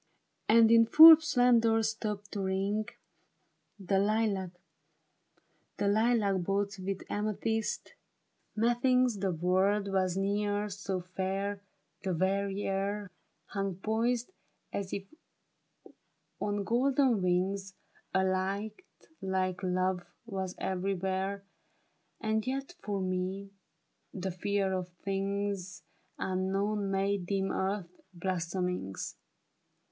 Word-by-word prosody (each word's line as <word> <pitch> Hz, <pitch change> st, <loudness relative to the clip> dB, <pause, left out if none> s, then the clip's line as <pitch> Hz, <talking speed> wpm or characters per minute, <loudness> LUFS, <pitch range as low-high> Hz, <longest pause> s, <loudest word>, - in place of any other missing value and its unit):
And 225 Hz, 0 st, +7 dB
in 230 Hz, 0 st, +6 dB
full 320 Hz, +5 st, +11 dB
splendor 240 Hz, -6 st, +3 dB
stopped 210 Hz, -2 st, -3 dB
to 200 Hz, -, -3 dB
ring 195 Hz, +3 st, -1 dB, 0.9 s
The 195 Hz, 0 st, +1 dB
lilac 200 Hz, -3 st, 0 dB, 1.9 s
boughs 200 Hz, +1 st, -1 dB
with 190 Hz, 0 st, -4 dB
amethyst. 215 Hz, +1 st, -2 dB, 0.6 s
Methinks 240 Hz, +1 st, +2 dB
the 195 Hz, 0 st, -1 dB
world 190 Hz, +4 st, +1 dB
was 185 Hz, -1 st, 0 dB
ne'er 205 Hz, +1 st, 0 dB
so 195 Hz, -2 st, -3 dB
fair; 195 Hz, +2 st, -3 dB, 0.4 s
The 190 Hz, -2 st, -1 dB
very 195 Hz, +3 st, 0 dB
air 200 Hz, +1 st, -2 dB, 0.3 s
Hung 195 Hz, -2 st, -3 dB
poised 230 Hz, -, -1 dB, 0.4 s
as 195 Hz, -1 st, -3 dB
if 195 Hz, -, -3 dB, 1.4 s
on 205 Hz, -1 st, -1 dB
golden 255 Hz, 0 st, +2 dB
wings; 190 Hz, +2 st, 0 dB, 0.4 s
A 190 Hz, -, +4 dB
light 195 Hz, -, -1 dB, 0.4 s
like 190 Hz, 0 st, -1 dB
love 185 Hz, -1 st, 0 dB, 0.2 s
was 190 Hz, -4 st, -4 dB
everywhere, 190 Hz, +1 st, -2 dB, 0.8 s
And 220 Hz, 0 st, -1 dB
yet 270 Hz, +5 st, -3 dB
for 200 Hz, -2 st, -2 dB
me, 185 Hz, +2 st, -3 dB, 0.6 s
the 190 Hz, -1 st, -3 dB
fear 195 Hz, +2 st, -1 dB
of 180 Hz, -1 st, -3 dB
things 195 Hz, -1 st, -2 dB, 0.3 s
Unknown, 195 Hz, +2 st, -1 dB
made 195 Hz, -1 st, 0 dB
dim 195 Hz, 0 st, 0 dB
earth's 190 Hz, -2 st, -3 dB
blossomings. 180 Hz, -, -3 dB
195 Hz, 95 wpm, -31 LUFS, 190-210 Hz, 1.9 s, full